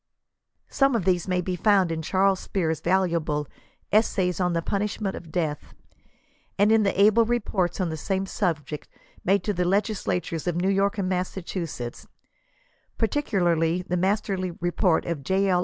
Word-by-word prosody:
Some 275 -2 +2
of 190 - -1
these 180 -2 +1
may 180 -1 +1
be 180 +1 -2
found 195 -2 +3
in 160 -1 -2
Charles 190 +3 +2
Spear's 160 -5 -1
valuable 170 -5 +1 0.5
89 215 - +7
Essays 180 -5 -1
on 180 -1 +1
the 165 0 -1
Punishment 205 0 -2
of 165 -2 -10
Death, 155 -4 -3 0.8
and 205 +2 +4
in 225 0 +5
the 200 -2 +2
ahle 215 +3 +4
reports 205 -7 0
on 180 -3 0
the 160 - -4
same 190 +4 -1
suhject, 160 -7 -3 0.4
made 195 +2 +2
to 210 - -1
the 180 -1 0
legislatures 180 -4 -1
of 175 - 0
New 185 +3 +1
York 200 +2 +1
and 195 -2 -1
Massachusetts, 180 -8 -4 0.9
particularly 180 - +1
the 180 - -2
masterly 190 0 0
report 175 +1 0
of 170 -4 -3
J. 190 +7 +1
L. 180 -1 +3
185 Hz, 160 wpm, -25 LUFS, 170-200 Hz, 0.9 s, 89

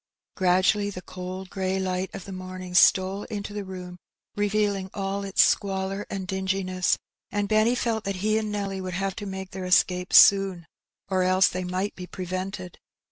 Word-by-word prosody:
Gradually 185 +2 +3
the 185 -2 -8
cold 185 +1 -7
grey 190 -1 -1
light 185 0 -1
of - - -7
the 195 - -8
morning 185 -1 -7
stole 190 +2 +4
into 205 -2 -5
the 205 - -3
i^om, 180 -2 -8 0.4
revealing 205 -2 0
all 195 0 -2
its 195 -1 +4
squalor 195 0 0
and 195 -1 -4
dinginess, 190 -1 0 0.3
and 205 0 -1
Benny 215 +3 +3
felt 230 -3 -1
that 195 0 -2
he 215 0 +3
and 215 -1 -3
Nelly 195 -2 -3
would 185 -1 -4
have 195 +1 -2
to 205 - -5
make 190 -1 -6
their 190 -1 -5
escape 180 0 +2
soon, 195 -4 +6 0.4
or 190 -1 +1
else 185 +1 +4
they 185 0 -4
might 185 +3 -2
be 180 -1 -8
prevented. 185 0 -5
190 Hz, 175 wpm, -26 LUFS, 185-200 Hz, 0.4 s, soon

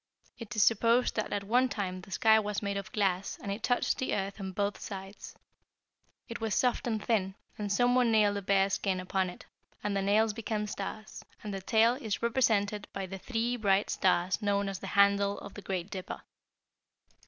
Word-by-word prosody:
It 230 0 -7
is 215 - +4
supposed 230 +3 +3
that 215 - -2
at 205 -1 -1
one 250 +5 +2
time 185 -5 -3
the 180 - -14
sky 220 +2 +4
was 210 -1 -3
made 200 0 -1
of 200 -1 -5
glass 195 -2 0
and 200 - -5
it 200 +3 -4
touched 245 +1 +1
the 260 - 0
earth 195 +1 -3
on 190 -1 -4
both 200 +2 -2
sides. 195 0 -8 0.9
It 235 - -7
was 220 -2 0
soft 250 -1 +1
and 220 -3 -2
thin, 195 -4 +1 0.2
and 205 -1 -4
someone 245 +2 +3
nailed 210 -2 +4
a - - -3
bear 195 0 +2
skin 190 -1 0
upon 185 0 -1
it, 180 - -11 0.4
and 205 -1 -1
the 195 - +1
nails 210 +2 +3
became 215 -1 -3
stars; 210 +1 -6 0.2
and 210 -1 -5
the 195 - -4
tail 225 +4 +4
is 230 -5 -4
represented 215 -4 +1
by 195 -1 -3
the 190 +1 -7
three 235 +3 -1
bright 200 -2 +2
stars 185 +1 +1
known 200 -1 +1
as 195 -1 -5
the - - -7
handle 200 0 +4
of 200 - -9
the 205 - -9
Great 190 -1 -4
Dipper. 185 -2 -6
205 Hz, 200 wpm, -30 LUFS, 195-220 Hz, 0.9 s, is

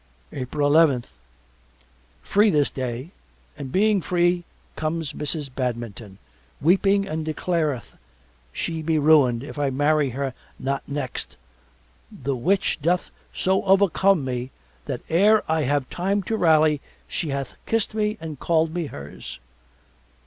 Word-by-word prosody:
April 140 +2 -2
eleventh 145 -5 +4 1.1
Free 210 +2 +4
this 150 -6 +2
day 130 +4 -4 0.4
and 135 -2 -7
being 205 +2 +3
free 175 +1 +1 0.3
comes 155 -1 -2
Mrs. 150 -2 -4
Badminton 120 -5 -4 0.4
weeping 195 +5 +3
and 160 -1 -3
declareth 155 -4 -1 0.6
she 160 - -3
be 160 0 +1
ruined 140 -6 +4
if 145 - -8
I 145 -1 +1
marry 145 +1 +2
her 135 +1 -3 0.2
not 135 +1 -2
next 140 -3 -5 0.7
the 140 - -3
which 180 +12 +1
doth 175 +4 0 0.2
so 190 +1 +1
overcome 195 -4 +4
me 125 0 -3 0.4
that - - -4
ere 205 +6 +4
I 160 -2 +1
have 140 -1 0
time 195 +3 0
to 225 - -1
rally 155 -6 +4 0.3
she 165 - -3
hath 140 -2 -3
kissed 225 -1 0
me 215 0 0
and 155 -4 -7
called 160 -1 +1
me 170 -3 -2
hers. 70 - -9
155 Hz, 130 wpm, -24 LUFS, 135-180 Hz, 1.1 s, eleventh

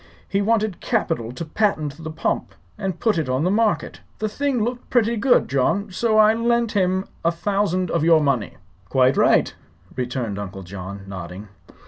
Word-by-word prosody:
He 200 - 0
wanted 215 -2 +1
capital 165 - -1
to 170 - -5
patent 155 -5 -1
the 160 - -4
pump 160 - -2 0.2
and 195 -4 -4
put 220 -7 +2
it 150 -5 -2
on 130 +3 +1
the 180 - +2
market. 220 +1 0 0.2
The 215 - -1
thing 260 +1 -1
looked 245 +2 -4
pretty 235 -1 +2
good, 245 +3 +3
John; 185 +10 0
so 220 +3 +1
I 215 0 +6
lent 235 0 +1
him 190 -2 +1 0.2
a 170 - +3
thousand 185 0 0
of 170 - +1
your 165 -1 +6
money." 140 -8 0 0.3
"Quite 130 0 +3
right," - - +3 0.4
returned 125 -5 -3
Uncle 95 -1 -6
John, 95 +2 -7
nodding. 95 +1 -8
180 Hz, 170 wpm, -22 LUFS, 130-215 Hz, 0.4 s, I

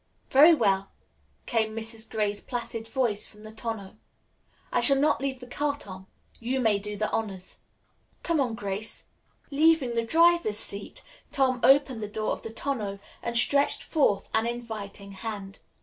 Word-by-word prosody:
"Very 305 +5 +8
well," 195 -6 +1 0.6
came 220 -2 0
Mrs. 225 0 -5
Gray's 210 -2 -1
placid 235 -2 -5
voice 225 -4 0
from 210 0 -16
the 215 - -9
tonneau. 220 -2 -6 0.7
"I - - +2
shall 275 +3 +6
not 290 +1 +2
leave 270 -2 -2
the 250 - -9
car, 285 +3 -1
Tom. 190 -6 -9 0.3
You 250 +3 -1
may 220 -5 +3
do 210 +1 -6
the 215 +1 -1
honors." 195 -4 -4 0.7
"Come 335 -2 +1
on, 245 -5 0
Grace." 205 0 -4 0.5
Leaving 300 -3 +3
the 230 - +1
driver's 330 -4 +4
seat, 200 -2 -6 0.3
Tom 260 -2 +2
opened 270 -4 +4
the 210 - -3
door 215 +1 -2
of - - -3
the 225 - -6
tonneau 225 -4 -3 0.2
and 235 0 -1
stretched 280 +4 +4
forth 280 - +1
an 220 +1 +2
inviting 215 -4 -6
hand. 195 -1 -7
225 Hz, 160 wpm, -27 LUFS, 210-265 Hz, 0.7 s, Very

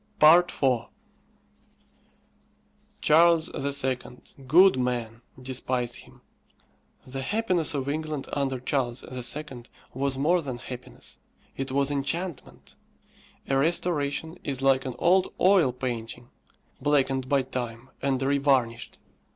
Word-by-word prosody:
IV. 165 +4 +8 2.6
Charles 165 +1 +4 0.3
II., 130 -1 +1 0.5
good 185 +4 +6
man! 120 -2 -2 0.2
despised 125 -1 -2
him. - - -16 0.8
The 135 +1 -6
happiness 180 -3 0
of 135 -1 -2
England 155 -1 -3
under 135 -2 -1
Charles 125 -1 -2
II. 130 0 -4 0.3
was 135 +1 -1
more 170 +6 +2
than 130 -5 -5
happiness, 125 0 -10 0.4
it 135 0 -4
was 140 +1 +1
enchantment. 145 +3 -4 0.7
A 135 - +1
restoration 160 +1 0
is 135 -2 -4
like 135 -1 +3
an 130 -2 -4
old 185 +5 +3
oil 185 -8 +4
painting, 120 -1 -5 0.5
blackened 135 -2 +1
by 140 -2 +3
time, 125 -1 -6
and 135 -2 0
revarnished. 135 -4 +1
135 Hz, 105 wpm, -26 LUFS, 130-155 Hz, 2.6 s, IV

